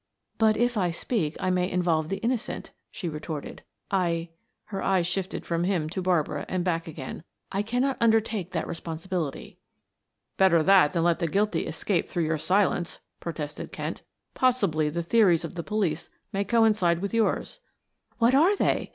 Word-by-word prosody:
"But 220 -1 +4
if 240 +1 +1
I 180 -3 +2
speak 170 -2 -2
I 185 - 0
may 180 0 +1
involve 170 -4 +1
the 195 - -1
innocent," 235 0 -2 0.2
she 180 - -5
retorted. 155 -1 -6 0.3
"I 170 -3 0 0.2
" - - -51
her 195 - -2
eyes 185 -3 +2
shifted 185 +1 -3
from 170 0 0
him 175 -5 0
to 190 - -3
Barbara 165 -5 0
and 185 -1 -1
back 165 -2 -1
again. 155 -1 -7 0.3
"I 195 - 0
cannot 245 +5 0
undertake 220 -5 +2
that 180 - -2
responsibility." 165 -2 -4 0.8
"Better 175 -4 +5
that 185 -5 +5
than 170 - +1
let 170 -1 +2
the 170 - 0
guilty 205 +6 0
escape 190 -5 -1
through 170 -2 -1
your 155 0 0
silence," 180 0 +1 0.2
protested 150 -3 -5
Kent. - - -5 0.3
"Possibly 200 -13 +2
the 170 +3 -2
theories 175 -4 +4
of 165 - -7
the 175 - -4
police 175 -5 -1 0.2
may 200 +1 0
coincide 210 -6 +3
with 200 +4 -4
yours. 230 - 0 0.6
"What 235 +1 +4
are 335 +9 +5
they?" - - 0
180 Hz, 170 wpm, -27 LUFS, 165-210 Hz, 0.8 s, Better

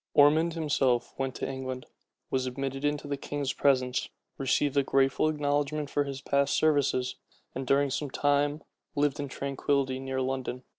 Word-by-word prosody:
Ormond 155 +3 +5
himself 135 -6 +1
went 135 -1 -2
over - - -3
to - - -3
England, 130 -1 -5 0.5
was 130 -1 0
admitted 135 +2 -4
into 145 0 -1
the 140 -1 -2
king's 140 -1 -3
presence, 130 -3 +2 0.3
received 135 +1 +1
a 140 - +5
grateful 135 +2 +2
acknowledgment 145 0 -1
for 145 - +1
his 135 -1 -5
past 140 0 +1
services, 140 -4 +2 0.4
and 130 0 -5
during 140 +1 +3
some 145 +2 -2
time 145 +2 +1 0.3
lived 145 0 +1
in 145 - -2
tranquillity 135 -1 -1
near 135 0 -3
London. 130 -1 -2
140 Hz, 160 wpm, -29 LUFS, 130-145 Hz, 0.5 s, Ormond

